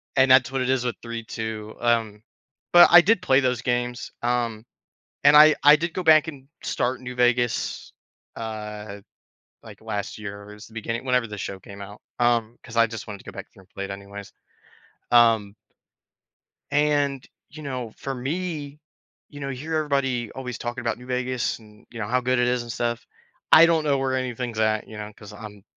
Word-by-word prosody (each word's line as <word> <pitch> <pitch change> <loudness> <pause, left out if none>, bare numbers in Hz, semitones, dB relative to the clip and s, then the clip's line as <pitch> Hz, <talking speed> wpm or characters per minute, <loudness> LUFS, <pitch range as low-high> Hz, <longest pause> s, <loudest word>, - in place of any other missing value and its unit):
and 130 0 +4
that's 130 0 +5
what 135 - -1
it 130 - -1
is 130 -2 +1
with 120 - -1
3.2. 110 -2 -6
Um, 115 -3 0 0.5
but 175 0 +9
I 175 0 +10
did 210 +2 +2
play 130 +1 +4
those 125 -3 0
games, 120 0 -2
um, 120 -2 -1 0.6
and 145 +1 +7
I 155 +1 +9
I 150 +1 +9
did 170 +1 -3
go 185 - -2
back 160 -1 +5
and 135 -3 -9 0.2
start 130 +1 -1
New 125 0 -7
Vegas, 120 -1 0 0.4
uh, 105 -2 -6 0.6
like, - - -13
last 100 +1 -4
year, 100 -1 -8
it - - -10
was 105 - -13
the 110 - -19
beginning 115 +3 -4
whenever 125 -2 +1
the 105 -1 -8
show 95 0 -5
came 100 +1 -12
out, 100 +1 -10 0.2
um 120 -1 +1
'cause 115 - -11
I 115 -1 +5
just 110 -2 -8
wanted 100 -2 -7
to - - -18
go - - -8
back - - -9
through - - -18
and 95 - -24
play 100 - -6
it 100 - -7
anyways, 100 0 -9 0.8
um 115 -4 +4 1.2
and, 145 -2 +1 0.2
you 155 0 -11
know, 125 -5 -5
for 135 - -4
me, 150 +2 -4 0.5
you 145 - -11
know, 140 -1 -4
you 130 - -5
hear 160 +2 -4
everybody 135 -6 -1
always 125 -3 -6
talking 120 +1 -5
about 115 -1 -2
New 125 - -13
Vegas 125 -1 -2
and, 105 -1 -19
you 115 - -9
know, 105 - -3
how 125 +3 +1
good 125 0 +1
it 125 - +2
is 125 0 +1
and 120 - -7
stuff. 120 0 -2 0.5
I 165 - +9
don't 165 -2 +2
know 140 -2 +2
where 135 -1 -1
anything's 125 -3 -3
at, 110 -1 +1
you 110 - -10
know, 105 0 -7
'cause 105 - -12
I'm 105 -2 -11
120 Hz, 200 wpm, -24 LUFS, 110-135 Hz, 1.2 s, I